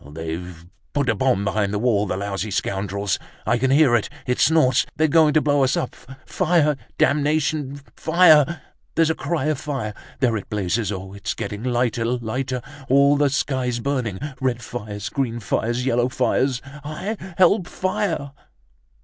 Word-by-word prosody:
They've 80 +2 -6 0.3
put 140 -3 +1
a - - +4
bomb 100 -3 +1
behind 100 0 0
the 105 - -1
wall, 105 -2 +1
the 95 - -2
lousy 100 +1 -3
scoundrels! 100 0 -1 0.3
I 120 +2 +2
can 130 +2 +1
hear 140 -3 +5
it, 115 - 0 0.2
it 125 -1 -1
snorts, 130 -6 +4
they're 160 - +3
going 155 -1 +4
to 155 - +5
blow 145 -2 +2
us 130 - +2
up! - - -3 0.3
Fire! 160 -4 +2 0.2
Damnation, 145 0 +1 0.2
fire! 160 -2 +4 0.3
There's 165 -1 +3
a - - +1
cry 160 -3 -2
of 155 -3 0
fire! 135 -8 -4 0.3
There 120 -5 +2
it 100 - -8
blazes. 105 +1 -1
Oh, 95 -1 -6
it's 100 +1 -4
getting 105 0 -5
lighter, 120 -2 0
lighter! 125 +2 -2 0.3
All 140 +2 +5
the 145 0 +3
sky's 130 -3 -1
burning, 125 -6 -2 0.2
red 125 -3 -1
fires, 105 -3 -6
green 120 -1 -2
fires, 120 +3 -1
yellow 120 -1 +2
fires. 130 0 0 0.2
Hi! 155 +9 -4 0.2
Help! 185 0 +4
Fire!" 185 -8 -2
125 Hz, 160 wpm, -22 LUFS, 105-145 Hz, 0.3 s, hear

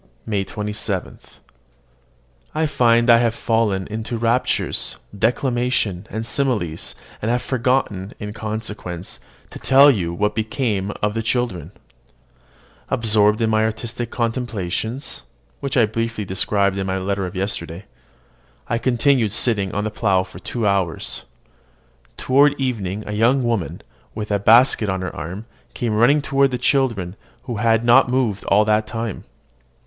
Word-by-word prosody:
MAY 105 -3 -1
27. 105 -2 -4 1.4
I 160 +1 +2
find 120 -5 +3
I 120 -1 +7
have 115 -1 +1
fallen 110 -6 0
into 110 +2 -4
raptures, 115 +2 0 0.2
declamation, 120 -4 0
and 110 +1 -4
similes, 115 - -1 0.3
and 110 - -1
have 120 +1 0
forgotten, 125 -6 0
in 105 0 -6
consequence, 105 -5 -5 0.3
to - - -9
tell 140 +2 +6
you 90 -9 -1
what 105 +5 0
became 110 -3 -1
of 105 0 +1
the 115 - -1
children. 115 - -2 1.2
Absorbed 105 -1 +2
in 110 -1 +2
my 110 0 +3
artistic 110 +2 -3
contemplations, 115 0 -3 0.4
which 140 -1 -2
I 120 - +6
briefly 115 0 -3
described 100 +1 0
in 95 - -2
my 95 0 -1
letter 95 0 -2
of 95 - -9
yesterday, 95 -2 -3 0.8
I 115 - 0
continued 125 -2 +2
sitting 105 -4 +1
on 105 - -2
the 110 - -2
plough 100 -4 +1
for 85 - -12
two 115 +4 -3
hours. 95 -5 -1 0.9
Toward 140 +2 +3
evening 105 -6 -2
a - - -5
young 120 +5 +2
woman, 115 -7 -2 0.3
with 105 -1 -4
a 100 - +2
basket 115 +1 +5
on 95 0 -1
her 95 - -5
arm, 95 +6 -6 0.3
came 115 -3 -1
running 130 +7 +4
toward 140 -2 +2
the 125 - -2
children, 120 -9 0 0.3
who 120 -4 -5
had 115 +1 +2
not 120 +1 +6
moved 125 -6 0
all 105 +2 +4
that 110 0 +2
time. 115 -3 -5
110 Hz, 145 wpm, -21 LUFS, 100-120 Hz, 1.4 s, I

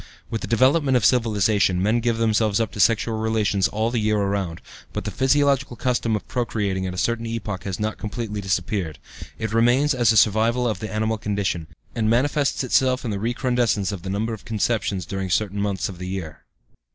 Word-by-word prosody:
With 115 - -2
the - - -4
development 130 +3 +3
of 115 - +1
civilization, 105 -6 +2
men 105 +5 +2
give 115 -1 0
themselves 110 -2 +2
up 115 - -1
to - - -9
sexual 110 +2 +2
relations 110 -3 +1
all 110 +2 -1
the 120 - 0
year 105 0 +1
around, 100 -4 -1 0.3
but - - -3
the - - -4
'physiological 135 -1 +2
custom' 120 -1 0
of 105 - -5
procreating 105 -6 -1
at 90 - -4
a - - -7
certain 115 +3 -1
epoch 105 -5 -4
has 95 -3 -4
not 110 0 -2
completely 105 -1 -4
disappeared; 95 -4 -2 0.4
it 110 -1 -3
remains 120 +6 +3
as 120 -3 +3
a 110 - +2
survival 115 +4 +3
of 105 -5 -2
the 110 - -5
animal 110 +1 -1
condition, 100 -6 -2 0.3
and 110 -2 0
manifests 140 +4 +1
itself 130 0 +2
in 115 - -2
the 100 - -2
recrudescence 120 -3 0
of 100 -4 -6
the 95 - -6
number 110 +4 -1
of 110 - -8
conceptions 110 -4 -1
during 95 +1 -4
certain 100 +2 0
months 100 -2 -1
of 90 -3 -9
the 90 - -5
year." 90 -5 -6
110 Hz, 200 wpm, -23 LUFS, 100-120 Hz, 0.4 s, development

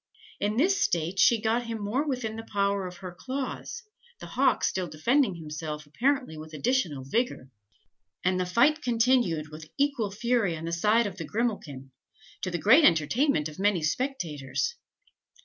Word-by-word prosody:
In 210 +2 -1
this 385 +8 +3
state 175 - 0
she 235 +5 +5
got 230 +2 0
him 230 -1 -3
more 215 +7 -1
within 245 -5 -2
the 225 - -5
power 200 -1 0
of 180 -1 -9
her 180 - -5
claws, 265 - -5 0.4
the - - -8
hawk - - +1
still 185 -1 0
defending 200 - +1
himself 150 -1 -6
apparently 255 - 0
with 155 0 -9
additional 170 - 0
vigour; 135 - -2 0.7
and 185 0 +1
the 180 - -1
fight 275 - +3
continued 230 -10 +2
with 155 +1 -10
equal 280 -7 +1
fury 215 -4 0
on 160 - -7
the 170 - -3
side 215 +7 +3
of 195 -2 -5
Grimalkin, 165 - -3 0.5
to 185 - -2
the 175 - -2
great 230 - +6
entertainment 170 - +3
of 155 +3 -11
many 195 -4 +2
spectators. 175 - -2
200 Hz, 160 wpm, -27 LUFS, 160-245 Hz, 0.7 s, great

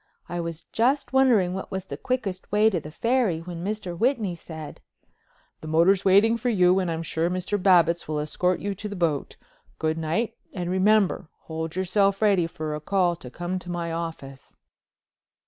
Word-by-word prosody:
I 175 - -4
was 165 -1 -5
just 260 +5 +1
wondering 235 -9 +4
what 190 - -5
was 190 -1 -4
the - - -6
quickest 215 -8 -3
way 210 +2 +4
to 180 - 0
the 150 - -9
Ferry 230 -1 0
when 170 0 -7
Mr. 200 -3 -3
Whitney 225 -2 +1
said: 160 -2 -9 0.8
"The 155 - -8
motor's 175 +5 +3
waiting 205 +4 +5
for 245 +2 -1
you 185 -4 +4
and 185 -2 -1
I'm 165 0 -2
sure 165 +1 -1
Mr. 185 +2 -2
Babbitts 175 -3 +4
will 155 0 -2
escort 175 +5 0
you 200 0 -2
to 210 +2 -6
the 205 - -6
boat. 165 -6 -1 0.4
Good 160 0 -1
night 165 +9 -1 0.2
and 180 -3 -3
remember—hold 185 -5 0
yourself 195 +1 +2
ready 195 -6 +3
for 155 -2 -5
a 150 - -5
call 180 0 +1
to 125 - -10
come 175 +6 -4
to 180 - -10
my 170 -1 -3
office." 160 -5 -7
180 Hz, 180 wpm, -25 LUFS, 165-205 Hz, 0.8 s, waiting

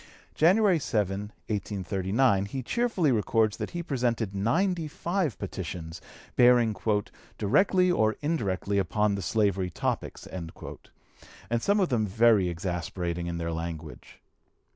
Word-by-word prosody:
January 185 +2 +4
7, 105 -8 -1 0.3
1839, 100 +1 0
he 130 +5 -5
cheerfully 210 - +1
records 110 -1 +1
that - - -4
he 175 0 -4
presented 120 - -1
ninety 165 - 0
five 170 - -2
petitions, 80 -1 -6 0.3
bearing 120 -3 +5 0.6
"directly 180 - +3
or 110 -9 +2
indirectly 100 - -1
upon 105 +2 +1
the 100 - -3
slavery 100 -2 +1
topics," 85 - -3
and 85 -3 -6 1.1
some 200 - +2
of 185 - +2
them 110 -4 +1
very 110 -2 +4
exasperating 85 0 -3
in 85 0 -3
their 85 0 -3
language. 80 -1 -7
110 Hz, 120 wpm, -28 LUFS, 95-145 Hz, 1.1 s, bearing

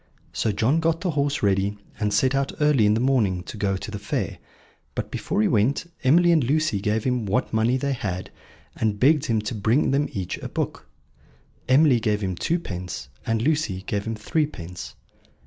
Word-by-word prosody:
So 110 - 0
John 120 +10 +2
got 165 0 0
the 180 - 0
horse 145 -3 0
ready, 100 +1 +1 0.2
and 105 -1 0
set 130 +6 +2
out 135 0 0
early 150 -8 +4
in 105 - +4
the - - +1
morning 115 -9 +1
to - - -8
go 100 -2 0
to 105 - -7
the 105 - -5
fair; 100 - -3 0.6
but - - -4
before 105 - -1
he - - +3
went 115 +8 +2 0.2
Emily 170 +6 +5
and 160 -4 +4
Lucy 140 -5 +1
gave 105 +1 0
him 125 -4 0
what 115 +6 0
money 115 +3 +2
they 140 +1 -1
had, 95 -7 -4 0.4
and 105 -2 -1
begged 145 +3 +4
him 110 -2 +1
to 105 +3 -4
bring 115 +7 +2
them 140 +2 +1
each 95 -3 -4
a - - -6
book. - - -4 0.8
Emily 135 -2 +5
gave 105 -2 0
him 95 -2 -2
twopence, 90 - -3 0.2
and 115 0 +1
Lucy 145 -11 0
gave 100 -1 -2
him 115 0 -2
threepence. 105 - -3
115 Hz, 190 wpm, -24 LUFS, 105-140 Hz, 0.8 s, Emily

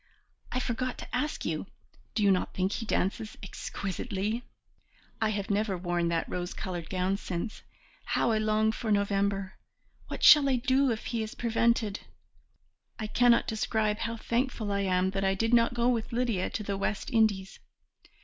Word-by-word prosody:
I 255 - 0
forgot 255 0 -2
to - - -6
ask 300 - -2
you, - - -2 0.5
do 215 - +1
you 200 - +5
not 185 - 0
think 190 +1 0
he 225 +1 -4
dances 210 +3 -1
exquisitely? 200 +4 -3 0.8
I 220 - +3
have 205 -1 -2
never 200 -2 0
worn 175 -1 0
that 170 -1 0
rose 180 0 -4
coloured 175 -3 -5
gown 185 +1 0
since. 195 +2 -5 0.4
How - - +1
I 220 - +2
long 215 0 +2
for 220 0 -3
November! 200 -1 0 0.5
What - - -6
shall 290 -2 +8
I 260 - +3
do 260 +2 +2
if 225 -2 -2
he 235 -2 -2
is 220 0 -5
prevented? 230 -3 +1 1.0
I 220 - -4
cannot 240 +2 +4
describe 220 -1 0
how 230 +1 -2
thankful 235 -2 -1
I 200 - 0
am 185 -1 +1
that 195 0 -2
I 195 0 +2
did 225 +4 0
not 235 0 +4
go 240 0 +2
with 235 -1 0
Lydia 235 -6 0
to 215 - -4
the 200 -1 -2
West 200 +4 -2
Indies. 210 -5 +1
215 Hz, 170 wpm, -29 LUFS, 195-235 Hz, 1.0 s, shall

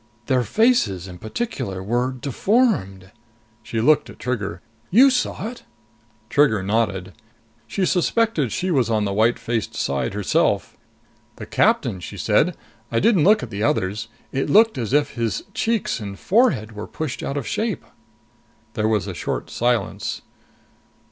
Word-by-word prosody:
"Their 130 -2 +2
faces, 120 - +2
in 90 -1 -10
particular, 110 - -4
were 120 +5 0
deformed!" 130 - 0 0.5
She 110 +1 -4
looked 150 +6 +3
at - - -12
Trigger. 105 -8 -3 0.3
"You 260 +8 +6
saw 250 -4 -1
it?" 245 - -11 0.7
Trigger 110 -6 +3
nodded. 100 -3 -1 0.5
She 195 - -1
suspected 180 - +1
she 185 0 -1
was 130 -7 +2
on 110 -2 +1
the 100 - -1
white 110 +4 +3
faced 115 -3 -3
side 70 +7 -1
herself. 105 -2 +1 0.6
"The - - -8
captain," 95 - +1
she 100 +3 -8
said. 150 - +2 0.3
"I 115 - +2
didn't 190 - +4
look 210 -6 +5
at 120 - -7
the 100 0 -4
others. 105 0 0 0.2
It 135 - -1
looked 220 - +5
as 115 -2 -3
if 145 +1 +2
his 115 -5 -2
cheeks 225 - 0
and 100 -2 -6
forehead 190 - +2
were 105 0 -7
pushed 130 -7 -5
out 140 - -3
of 140 - -3
shape!" 215 - -2 0.9
There 110 0 0
was 110 -3 +1
a 100 - -5
short - - -4
silence. 120 0 -1
120 Hz, 150 wpm, -22 LUFS, -, 0.9 s, You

